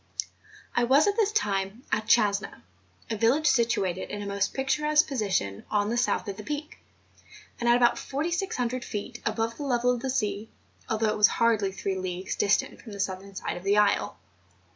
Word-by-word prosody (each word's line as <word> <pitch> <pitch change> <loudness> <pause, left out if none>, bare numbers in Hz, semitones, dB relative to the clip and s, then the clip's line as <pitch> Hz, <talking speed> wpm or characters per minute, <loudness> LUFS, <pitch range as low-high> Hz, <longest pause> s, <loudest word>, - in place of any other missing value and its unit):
I 240 - +3
was, 275 +5 +5
at 405 - +1
this 425 -3 +2
time, 200 - -1
at 215 +1 0
Chasna, 205 -3 +2 0.5
a - - 0
village 240 +8 +2
situated 230 -9 +1
in 205 0 -5
a - - -6
most 200 -1 -1
picturesque 300 +3 +2
position 195 - -1
on 205 0 +1
the - - 0
south 245 -2 0
of 200 -1 -5
the 210 - -7
peak, 300 +4 -5 0.8
and 235 - +1
at 240 - +6
about 240 -1 +3
4600 280 -5 -2
feet 225 +3 -6
above 225 +1 -1
the - - -5
level 250 -2 +2
of 245 - -1
the 265 - -2
sea, 210 -4 -1 0.4
although 220 0 +1
it 215 - -1
was 210 -1 +7
hardly 220 -4 +2
three 190 0 -3
leagues 185 0 -4
distant 205 0 +1
from 220 - -10
the 200 - -8
southern 195 0 -4
side - - -4
of 175 - -9
the 200 +1 +2
isle. 205 -1 +2
225 Hz, 185 wpm, -27 LUFS, 200-255 Hz, 0.8 s, was